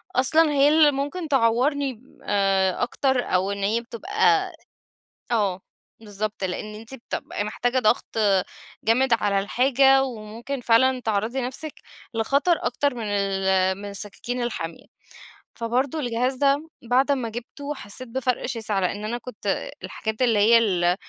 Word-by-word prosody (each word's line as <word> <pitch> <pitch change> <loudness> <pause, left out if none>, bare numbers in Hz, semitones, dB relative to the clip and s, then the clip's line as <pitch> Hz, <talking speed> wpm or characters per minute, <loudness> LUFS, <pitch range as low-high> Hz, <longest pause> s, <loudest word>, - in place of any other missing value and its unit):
أصلًا 310 +4 +4
هي 285 0 +4
اللي 305 -1 +6
ممكن 290 +5 -3
تعورني 265 0 +1 0.2
آآ 195 -1 +1
أكتر 265 +1 +1
أو 185 +2 0
إن 200 0 -4
هي 220 +4 +1
بتبقى 385 - +1 0.8
آه، 200 -5 +1 0.4
بالضبط 210 -1 -4
لأن 210 +3 -4
أنتِ 225 +4 -10
بتبقي 230 -4 -5
محتاجة 245 +4 -1
ضغط 230 -1 +1 0.7
جامد 245 +3 +3
على 200 -1 +1
الحاجة 270 +5 +4
وممكن 235 +2 -6
فعلًا 250 +2 +3
تعرضي 220 +3 -1
نفسِك 265 +5 -5 0.4
لخطر 280 +9 +2
أكتر 285 +2 0
من 235 -2 -5
ال 190 -2 +1
من 205 0 -7
السكاكين 215 +5 -5
الحامية. 170 -9 -5 0.7
فبرضه 250 +6 -1
الجهاز 250 -1 0
ده 280 +4 +1 0.2
بعد 265 +3 +3
أمّا 255 -5 -1
جبته 260 +6 -6
حسّيت 255 +1 -6
بفرق 255 0 -1
شاسع، 220 -5 -2
لأن 200 +3 -2
أنا 235 +3 -2
كنت 250 +1 -4
الحاجات 220 +1 -4
اللي 230 -4 +3
هي 225 +3 +6
ال 180 -6 +2
235 Hz, 135 wpm, -24 LUFS, 210-270 Hz, 0.8 s, اللي